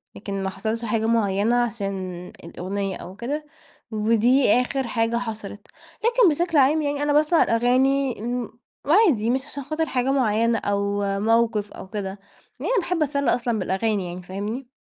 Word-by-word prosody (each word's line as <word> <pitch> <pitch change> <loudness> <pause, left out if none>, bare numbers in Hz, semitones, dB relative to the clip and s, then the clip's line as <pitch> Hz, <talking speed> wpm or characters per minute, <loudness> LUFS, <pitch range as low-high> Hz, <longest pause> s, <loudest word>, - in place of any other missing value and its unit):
لكن 195 -1 -4
ما 190 - -1
حصلش 220 +4 -3
حاجة 220 0 0
مُعيّنة 220 0 +2
عشان 195 -5 -4 0.2
الأغنية 190 +3 -4
أو 185 - -10
كده، 285 +8 -4 0.5
ودي 230 +3 +3
آخر 265 0 -2
حاجة 230 0 0
حصلت. 220 -3 -6 0.4
لكن 475 -4 +5
بشكل 340 -3 0
عام 290 +3 +4
يعني 290 -1 -1
أنا 290 0 +1
باسمع 305 +3 +4
الأغاني، 255 +3 +2
امم، 235 0 -4 0.3
عادي 295 - +4
مش 260 +2 0
عشان 285 -2 -7
خاطر 310 +4 -1
حاجة 255 +1 0
مُعيّنة 230 -3 +2
أو 200 0 -1 0.2
موقف 225 -1 +1
أو - - -9
كده، 195 -2 -5 0.4
يعني - - -2
باحب 350 -3 0
اتسلي 280 -3 +1
أصلًا 235 -2 -1
بالأغاني 195 +1 0
يعني 180 +1 -7
فاهمني؟ 205 +8 -5
230 Hz, 155 wpm, -23 LUFS, 205-270 Hz, 0.5 s, لكن